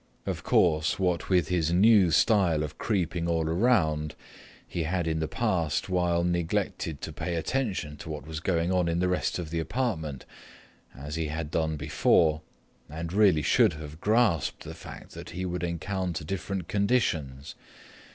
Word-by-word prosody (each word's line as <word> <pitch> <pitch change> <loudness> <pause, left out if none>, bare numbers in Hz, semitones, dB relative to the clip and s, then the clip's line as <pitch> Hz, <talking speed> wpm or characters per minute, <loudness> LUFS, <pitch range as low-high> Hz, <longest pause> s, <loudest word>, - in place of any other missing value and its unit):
Of - - -3
course, 80 -2 +2
what 90 -3 0
with 90 -3 +2
his 85 -3 +1
new 100 0 +5
style 85 -4 +3
of 75 0 -7
creeping 90 -5 -1
all 80 -2 0
around, 80 -6 +1 0.5
he 85 - -3
had 85 +2 -1
in 80 -1 -1
the 80 - -1
past 80 +1 -1
while 90 -2 +1
neglected 85 -3 -1
to - - -6
pay 85 - -3
attention 95 - -2
to 75 - -9
what 75 -3 -6
was 80 0 -5
going 85 +1 0
on 90 -2 +2
in 85 0 0
the 90 +1 +1
rest 90 0 0
of 85 -4 -5
the 85 - -1
apartment, 80 - -2 0.7
as 75 +3 -6
he 80 -1 -1
had 75 0 -4
done 80 -1 0
before, 75 +1 +2 0.5
and 85 +3 -5
really 95 -7 +4
should - - +4
have 75 +1 -9
grasped 105 - +2
the - - -7
fact - - -11
that - - -9
he 90 +1 -4
would 90 -1 -3
encounter 85 0 -3
different 95 +1 -4
conditions. 85 - 0
85 Hz, 165 wpm, -28 LUFS, 80-95 Hz, 0.7 s, new